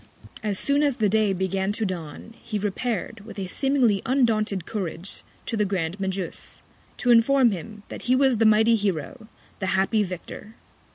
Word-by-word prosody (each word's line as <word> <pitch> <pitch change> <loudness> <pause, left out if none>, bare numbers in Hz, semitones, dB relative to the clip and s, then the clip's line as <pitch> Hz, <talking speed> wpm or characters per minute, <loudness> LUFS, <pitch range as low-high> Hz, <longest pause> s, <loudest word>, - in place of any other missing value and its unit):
As 205 -2 -2
soon 280 +6 +1
as 285 -3 +2
the 215 -3 +2
Day 215 0 +2
began 190 +1 -1
to 220 +1 -2
dawn, 180 +3 -6
he 215 - -3
repair'd, 210 +2 -2
with 210 +2 -11
a 195 - -3
seemingly 245 -1 +1
undaunted 215 -8 +1
Courage, 190 -3 -5 0.2
to 230 - -2
the 210 - +2
Grand 185 -2 -2
Magus, 190 -2 -4 0.3
to 245 - +2
inform 240 +1 +5
him, 210 +3 -7
that - - -7
he 255 - +5
was 265 -2 +3
the 225 - +3
mighty 220 +2 +5
Hero, 205 - -3 0.3
the 190 - -2
happy 205 +3 +2
Victor. 195 +3 -6
210 Hz, 170 wpm, -25 LUFS, 190-230 Hz, 0.3 s, inform